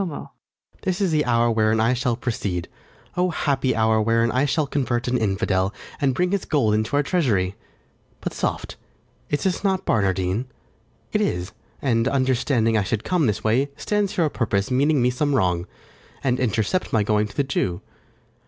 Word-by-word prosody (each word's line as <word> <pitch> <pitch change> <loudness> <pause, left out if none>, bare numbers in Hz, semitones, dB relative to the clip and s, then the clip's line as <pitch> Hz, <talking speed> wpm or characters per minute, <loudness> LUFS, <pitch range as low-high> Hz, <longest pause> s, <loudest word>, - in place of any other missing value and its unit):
This 185 -1 -1
is 195 -4 +1
the 155 -1 +2
hour 120 -1 +3
wherein 110 0 +2
I 115 +3 +3
shall 125 -1 0
proceed; 110 -8 -3 0.5
O 180 +1 +2
happy 140 -6 0
hour, 110 -1 +3
wherein 115 +1 +2
I 130 +5 +2
shall 150 +2 +1
convert 130 -4 -1
An 125 - +1
infidel, 95 -3 +1 0.3
and 135 -3 +2
bring 180 +4 +1
his 200 -2 0
gold 130 -9 +1
into 110 +5 0
our 145 - +3
treasury! 115 - +1 0.7
But - - -4
soft! - - -3 0.5
is 180 +6 -1
not 190 -2 +1
this - - -35
Barnardine? 95 +1 +1 0.7
it - - +2
is; 90 +2 -1 0.3
And, 115 -3 +2
understanding 130 -3 +1
I 110 - +3
should 105 +3 -2
come 175 -7 +1
this 105 - -1
way, 125 +6 +2
Stands 210 -2 -1
here 170 - +2
o' - - +1
purpose, 105 -1 -1
meaning 140 +1 +3
me 125 - +3
some 145 +3 0
wrong, 90 -5 +1 0.6
And 130 -2 +1
intercept 120 - 0
my 110 -2 +3
going 105 0 +1
to - - -15
the 140 - +3
Jew. 95 -9 -1
120 Hz, 175 wpm, -23 LUFS, 110-145 Hz, 0.7 s, hour